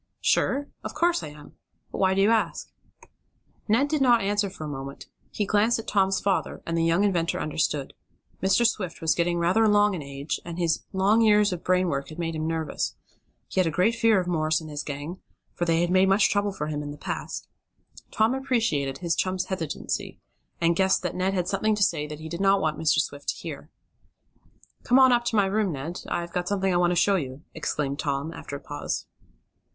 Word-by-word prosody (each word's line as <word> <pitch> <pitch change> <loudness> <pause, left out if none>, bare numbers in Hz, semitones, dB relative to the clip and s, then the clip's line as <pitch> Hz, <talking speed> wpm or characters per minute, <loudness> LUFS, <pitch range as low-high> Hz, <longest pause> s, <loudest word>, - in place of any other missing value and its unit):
"Sure? 280 +2 +2 0.2
Of - - -6
course 345 0 +2
I - - -6
am. 150 0 -13 0.3
But - - -5
why 190 -1 +3
do 195 - +3
you 210 - +4
ask?" 225 -1 0 1.0
Ned 230 +7 +3
did 300 -1 -1
not 240 -5 +5
answer 205 0 +1
for 170 - -9
a - - -4
moment. 140 -1 -7 0.2
He 210 - -2
glanced 215 +3 +2
at 225 - -7
Tom's 195 -2 +2
father, 195 0 -1
and 165 - -2
the 165 - +1
young 165 +4 +3
inventor 175 -5 +1
understood. 150 -2 -1 0.5
Mr. 195 +5 +3
Swift 185 -7 -1
was 160 -1 +2
getting 175 0 0
rather 175 +6 +3
along 210 -1 +4
in 175 - -4
age, 140 +1 -4
and 170 0 -7
his 170 -2 +1
long 200 +4 +3
years 210 -2 +4
of 175 - -6
brain 185 0 +2
work 140 -4 -2
had 155 - -10
made 165 -1 -2
him 155 0 -2
nervous. 160 -1 -2 0.5
He - - -2
had 185 - +3
a - - +2
great 180 +8 +2
fear 225 -3 +3
of 180 - -2
Morse 155 -3 +1
and 155 -2 -9
his 145 0 -3
gang, 150 +5 -6 0.3
for 175 - -2
they 165 0 +2
had 175 0 0
made 190 +1 +4
much 195 +2 +4
trouble 205 0 +1
for 150 -6 -4
him 150 -1 -3
in 145 - -6
the 145 - -8
past. - - -5 0.6
Tom 220 +3 +2
appreciated 225 - 0
his 170 0 -1
chum's 185 0 -1
hesitancy, 170 -6 -4 0.4
and 170 0 +2
guessed 190 +1 +2
that 180 - -2
Ned 190 +1 0
had 180 -1 -1
something 210 +3 +1
to 205 - +1
say 150 -5 0
that 150 0 -8
he 160 - -7
did 170 +3 -5
not 195 0 +4
want 155 -4 -1
Mr. 155 -2 +2
Swift 145 0 -3
to - - 0
hear. - - -8 1.1
"Come 250 - +3
on 260 -1 +7
up 240 -1 +2
to 235 - -1
my 205 -2 +4
room, 200 0 0
Ned. 155 +5 -5
I've 170 0 -3
got 180 0 -2
something 195 -1 0
I - - +3
want 175 0 +3
to 180 - +1
show 195 +3 +3
you," 135 -2 -6
exclaimed 145 -3 -2
Tom, 140 +2 -2
after 140 - -7
a - - -6
pause. 145 0 -4
180 Hz, 220 wpm, -26 LUFS, 155-205 Hz, 1.1 s, on